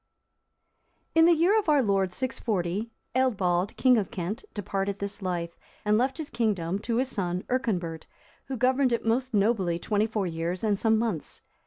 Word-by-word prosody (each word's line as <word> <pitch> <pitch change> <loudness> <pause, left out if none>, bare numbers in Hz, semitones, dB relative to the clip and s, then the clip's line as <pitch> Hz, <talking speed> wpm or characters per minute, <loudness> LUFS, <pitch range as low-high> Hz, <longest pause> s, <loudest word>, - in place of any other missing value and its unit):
] - - -46
In 325 0 +6
the 340 0 +6
year 365 +7 +4
of 400 - -2
our 290 -3 +4
Lord 195 -3 +1
640, 210 -3 -2 0.3
Eadbald,(331) 195 -8 +1
king 255 -2 +5
of 200 - -3
Kent, 205 +3 -4
departed 200 -1 -2
this 200 0 -5
life, 175 -2 -3 0.3
and 210 0 +3
left 260 +4 +1
his 315 -3 -6
kingdom 195 -5 0
to 230 +2 -2
his 255 +3 +1
son 180 -5 -2
Earconbert, 180 -11 -1 0.4
who 265 - -4
governed 255 +2 +3
it 235 - -1
most 245 +2 0
nobly 200 -5 +2
twenty 210 +4 0
four 215 -3 -1
years 170 +2 -3
and 205 -3 +1
some 220 -1 +3
months. 215 -9 -3
210 Hz, 175 wpm, -27 LUFS, 185-250 Hz, 0.4 s, In